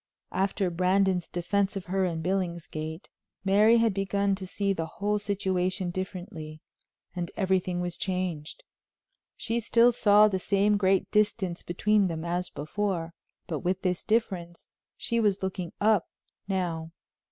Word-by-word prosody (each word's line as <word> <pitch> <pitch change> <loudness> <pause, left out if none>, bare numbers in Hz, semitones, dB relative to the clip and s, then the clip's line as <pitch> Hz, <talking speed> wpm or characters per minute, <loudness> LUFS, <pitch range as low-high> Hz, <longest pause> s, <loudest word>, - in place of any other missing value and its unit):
After 195 -1 0
Brandon's 185 0 +2
defense 200 +3 0
of 195 - -4
her 190 +1 0
in 165 -2 -2
Billingsgate, 170 -3 -3 0.4
Mary 210 +4 +5
had 230 -2 +3
begun 200 0 0
to 190 -1 -4
see 200 +1 0
the 165 -3 -3
whole 210 +1 0
situation 190 -2 -1
differently, 175 -4 -6 0.6
and 175 -1 -3
everything 185 -2 +1
was 175 -1 -3
changed. 180 -5 -3 0.7
She 230 +1 -1
still 235 +1 +4
saw 210 -2 +6
the 190 -3 -1
same 200 +2 +2
great 195 -1 +2
distance 205 -4 +1
between 205 +3 +2
them 165 -1 -4
as 175 +1 -2
before, 170 +1 -3 0.3
but 155 -3 -3
with 185 +1 -1
this 180 -2 0
difference, 185 -7 -1 0.3
she 235 - 0
was 205 -3 +1
looking 185 -2 -3
up 210 -3 +3 0.4
now. 175 -4 -2
190 Hz, 140 wpm, -28 LUFS, 175-200 Hz, 0.7 s, saw